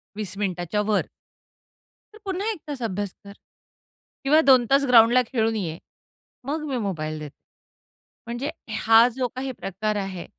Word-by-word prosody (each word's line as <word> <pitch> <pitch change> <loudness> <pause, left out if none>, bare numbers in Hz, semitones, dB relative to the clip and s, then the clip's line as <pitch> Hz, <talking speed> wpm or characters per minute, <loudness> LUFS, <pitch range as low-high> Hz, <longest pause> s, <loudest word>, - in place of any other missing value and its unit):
20 205 -2 -5
मिनिटाच्या 185 0 -1
वर 205 - +3 1.1
"तर 430 - -14
पुन्हा 390 +3 -2
1 410 - -6
तास 280 -4 -5
अभ्यास 205 -2 -2
कर. 200 0 -11 0.9
किंवा 300 +3 +5
2 255 -3 +7
तास 275 0 +4
ग्राउंडला 240 +1 +6
खेळून 225 -3 0
ये. 170 -6 -3 0.7
मग 305 +2 -3
मी 260 - -1
मोबाईल 155 -8 -3
देते." 150 -1 -9 0.9
म्हणजे 240 +4 -3 0.3
हा 225 +1 +6
जो 255 -1 0
काही 265 +1 -3
प्रकार 215 -2 -3
आहे, 195 -3 -4
225 Hz, 145 wpm, -24 LUFS, 195-265 Hz, 1.1 s, 2